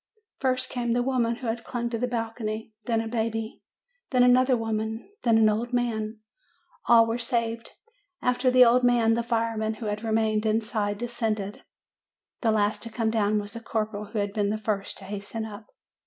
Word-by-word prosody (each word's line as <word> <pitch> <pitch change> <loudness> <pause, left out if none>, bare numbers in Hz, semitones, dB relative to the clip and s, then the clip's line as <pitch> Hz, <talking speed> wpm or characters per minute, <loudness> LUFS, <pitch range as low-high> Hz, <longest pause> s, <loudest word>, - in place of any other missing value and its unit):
"First 255 -1 0
came 240 -2 -1
the 245 0 +1
woman 245 -3 +1
who 250 - -9
had 230 +1 -2
clung 235 -1 -3
to 230 - -2
the 250 - 0
bal 230 -2 -2
cony, 220 -1 -4
then 230 -2 +1
a 225 - -4
baby, 225 -1 -2 0.5
then 250 -2 +4
another 255 +1 +5
woman, 220 0 -3
then 230 -2 +4
an 220 -1 +5
old 230 +3 0
man. 220 -3 -1 0.7
All 230 -1 +7
were 225 +1 -2
saved. 230 -1 -2 0.5
After 250 +1 +2
the 250 0 +7
old 245 +2 +4
man, 240 -2 +4
the 235 - +1
fire 230 -1 -1
men 220 0 -1
who 220 - -7
had 210 +1 -3
remained 220 -1 +1
inside 215 -2 0
descended. 220 -3 -3 0.8
The 230 - +2
last 210 -1 +1
to 230 - -4
come 220 0 0
down 215 -1 +2
was 205 0 -6
the 230 - -5
corporal 215 -2 -3
who 215 - -7
had 200 -1 -1
been 205 -1 +1
the 215 - 0
first 210 -2 -2
to - - -12
hasten 205 +3 -5
up. 215 0 -9
225 Hz, 195 wpm, -26 LUFS, 215-240 Hz, 0.8 s, All